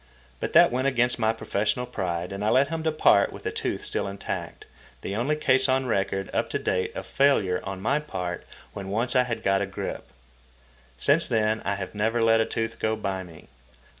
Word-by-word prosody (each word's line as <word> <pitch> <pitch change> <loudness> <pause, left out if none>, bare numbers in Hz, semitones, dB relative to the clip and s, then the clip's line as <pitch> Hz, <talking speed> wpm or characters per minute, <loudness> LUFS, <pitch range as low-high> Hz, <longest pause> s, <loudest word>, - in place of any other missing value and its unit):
But - - -3
that - - +7
went 130 +2 0
against 125 -2 +2
my 110 -1 +3
professional 115 +2 -1
pride 90 -7 -3
and 100 +1 -4
I 105 - +2
let 135 +4 +4
him 165 -1 -3
depart 155 -10 +3
with - - -10
the - - -2
tooth - - -3
still - - -2
intact, 100 0 -5 0.4
the 100 - -4
only 130 +7 +1
case 130 -3 +2
on 130 0 +2
record 95 -4 -1
up - - 0
to - - -1
date 95 0 -1
of - - -5
failure 105 -10 +2
on 95 -1 -5
my 140 +6 +2
part 90 -12 -5 0.3
when 95 -1 -6
once 120 +6 -1
I 125 0 +4
had 120 -2 -4
got 95 0 +2
a 100 - -1
grip. 95 - -5 0.9
Since 145 - +3
then 110 -2 +1
I 100 - 0
have 95 -2 -6
never 110 +3 0
let 115 0 +5
a - - +2
tooth 115 0 -3
go 110 0 0
by 100 -3 -3
me. 85 -3 -13
110 Hz, 205 wpm, -26 LUFS, 95-125 Hz, 0.9 s, that